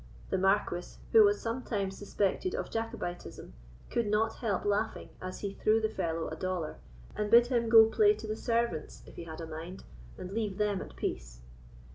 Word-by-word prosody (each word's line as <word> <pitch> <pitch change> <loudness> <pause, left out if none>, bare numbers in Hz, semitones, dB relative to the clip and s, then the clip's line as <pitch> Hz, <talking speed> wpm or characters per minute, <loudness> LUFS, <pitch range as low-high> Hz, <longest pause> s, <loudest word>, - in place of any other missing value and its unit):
The - - +2
Marquis, 190 -2 0
who 445 -1 +8
was 410 0 +3
sometimes 225 -5 -3
suspected 205 - -1
of - - -4
Jacobitism, 225 - -5 0.4
could 235 -3 0
not 220 +2 +1
help 210 -6 -1
laughing 205 +2 -1
as 185 0 -6
he 200 -1 -3
threw 215 +2 +2
the 220 -1 0
fellow 165 -3 -2
a 160 - -5
dollar, 175 - -3 0.4
and 210 0 -1
bid 235 +2 +8
him 240 -2 0
go 225 -1 +9
play 215 -1 +4
to 215 +1 -9
the 215 0 -2
servants 230 -9 -2
if - - -14
he 170 - -7
had 160 0 -8
a - - -4
mind, 165 +3 -8 0.3
and 185 - -7
leave 210 -2 -2
them 210 -2 0
at 65 - -9
peace. - - -4
205 Hz, 185 wpm, -31 LUFS, 180-225 Hz, 0.4 s, go